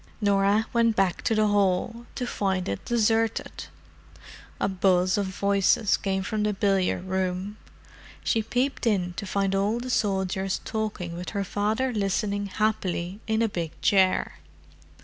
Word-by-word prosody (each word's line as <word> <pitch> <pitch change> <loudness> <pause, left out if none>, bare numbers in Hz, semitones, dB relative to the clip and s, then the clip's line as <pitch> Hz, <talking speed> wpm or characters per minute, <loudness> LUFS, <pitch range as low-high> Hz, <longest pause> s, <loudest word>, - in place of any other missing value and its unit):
Norah 200 +1 +3
went 230 -1 +3
back 190 -4 +1
to 225 - +2
the 215 0 +3
hall—to 205 +5 0
find 190 -5 -1
it 100 - -3
deserted. 225 -1 0 0.9
A - - +1
buzz 185 -1 +2
of 200 -2 0
voices 200 +2 +2
came 190 -1 -2
from 215 +2 -2
the 210 0 +1
billiard 195 -2 +1
room; 190 +2 -2 0.7
she 225 - +1
peeped 250 +3 -1
in 180 -5 +1
to 200 - -6
find 195 0 0
all 200 +4 +1
the 250 +1 -4
soldiers 190 -3 0
talking 210 -6 -3
with 180 +1 -5
her 200 - +1
father 215 +6 -1
listening 200 0 -1
happily 190 -2 -1
in 220 +1 +1
a - - +3
big 170 -6 -5
chair. 190 -3 +2
200 Hz, 145 wpm, -26 LUFS, 190-220 Hz, 0.9 s, Norah